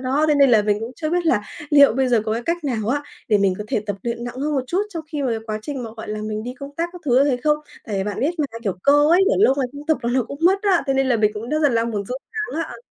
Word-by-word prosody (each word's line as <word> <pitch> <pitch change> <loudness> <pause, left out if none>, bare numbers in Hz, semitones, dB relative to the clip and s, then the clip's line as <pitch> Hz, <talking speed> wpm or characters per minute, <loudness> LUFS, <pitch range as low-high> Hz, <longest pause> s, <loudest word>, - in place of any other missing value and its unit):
Đó, 265 +4 +1
thế 300 - +4
nên 280 -2 +5
là 215 -3 +5
mình 210 0 0
cũng 225 +3 -5
chưa 310 -2 -3
biết 350 0 0
là 240 -10 +3 0.3
liệu 285 -4 +7
bây 260 +2 +1
giờ 240 -3 +3
có 215 - -1
cái 230 +2 -2
cách 335 +4 -2
nào 225 -6 -2
á, 285 +4 0 0.3
để 210 -3 +4
mình 195 -2 +2
có 210 - -5
thể - - 0
tập 205 -2 -2
luyện 235 0 -3
nặng 245 0 -6
hơn 295 +3 -1
một 265 -2 0
chút, 365 +9 0
trong 330 -6 -6
khi 295 - -2
mà 255 -3 0
quá 215 -1 -3
trình 275 -1 -5
mà, 230 - -6
gọi 220 - -8
là, 215 0 -4
mình 215 0 -4
đi 250 +2 -6
công 280 +1 -10
tác 335 +1 -1
các 360 - -10
thứ 250 -4 +2
như 290 - +2
thế 255 - +1
không? 300 0 +4 0.3
Tại 210 - -4
vì 190 - -1
bạn 205 0 -4
biết 285 +5 +2
mà, - - +2 0.2
kiểu, 200 - 0
cơ 280 - +5 0.2
ấy, 350 +2 +5
để - - +3
lâu 385 -9 +5
ngày 265 - +1
không 290 +1 -10
tập 315 - +2
là 235 - -1
nó 260 - +2
cũng 280 +5 -8
mất 385 +3 +4
á, 385 -4 +3
thế 270 - +1
nên 270 0 +2
là 245 - +3
mình 210 -1 +3
cũng 220 +3 -6
rất 305 +3 0
là 290 - +5
đang 230 -2 0
muốn 205 -2 -3
sốt 255 +2 -4 0.3
sắng 320 - -3
á. - - -7
260 Hz, 345 wpm, -21 LUFS, 225-295 Hz, 0.3 s, liệu